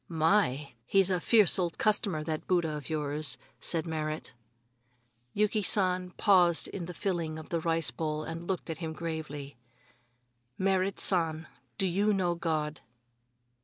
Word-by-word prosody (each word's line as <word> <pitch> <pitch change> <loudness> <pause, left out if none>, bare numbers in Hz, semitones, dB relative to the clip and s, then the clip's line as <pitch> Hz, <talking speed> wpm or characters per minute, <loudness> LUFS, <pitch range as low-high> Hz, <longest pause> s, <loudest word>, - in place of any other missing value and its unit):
"My! 160 -4 +2 0.2
he's 195 -1 +3
a 180 - +1
fierce 210 -1 +4
old 175 -2 -1
customer, 200 -7 +1
that 155 0 -4
Buddha 170 -4 +1
of 150 -2 -7
yours," 150 -2 +1 0.2
said 165 -1 -1
Merrit. 155 -3 -4 1.0
Yuki 210 +1 +2
San 185 -2 +2
paused 180 -4 +4
in 175 -4 -6
the 180 - -6
filling 170 -6 -2
of 160 - -10
the 170 - 0
rice 165 -5 +1
bowl 155 +3 -3
and 165 +2 -6
looked 185 -3 -2
at 160 - -6
him 160 -2 -4
gravely: 155 -5 -6 1.0
"Merrit 190 0 +1
San, 165 -3 +1 0.3
do 195 - 0
you 200 +4 +2
know 180 -3 +1
God?" 155 -3 -2
165 Hz, 145 wpm, -30 LUFS, 155-185 Hz, 1.0 s, fierce